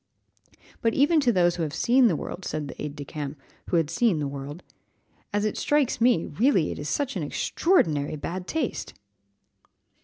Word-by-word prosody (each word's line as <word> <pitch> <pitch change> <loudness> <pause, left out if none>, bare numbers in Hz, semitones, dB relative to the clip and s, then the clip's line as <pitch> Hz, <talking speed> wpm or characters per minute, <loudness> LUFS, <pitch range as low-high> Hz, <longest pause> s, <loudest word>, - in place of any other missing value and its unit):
"But 230 -1 +1
even 295 +4 +4
to 260 -5 +3
those 175 -4 +2
who - - -2
have 155 -1 -2
seen 245 +8 +4
the 180 - +2
world," 180 - -6
said 155 -4 -3
the - - -9
aide 150 -1 -5
de 145 -1 -7
camp, 150 -1 -6 0.3
who 175 - +2
had 160 -2 +1
seen 205 0 +2
the 145 -2 -1
world, 140 +4 -7 0.7
"as 205 0 0
it 215 - -1
strikes 290 -6 +1
me, 235 -9 +4
really 190 - +2
it - - -6
is 145 0 -4
such 275 - -1
extraordinary 155 - +1
bad 180 +5 -5
taste!" 315 -6 -3
175 Hz, 180 wpm, -26 LUFS, 150-240 Hz, 0.7 s, even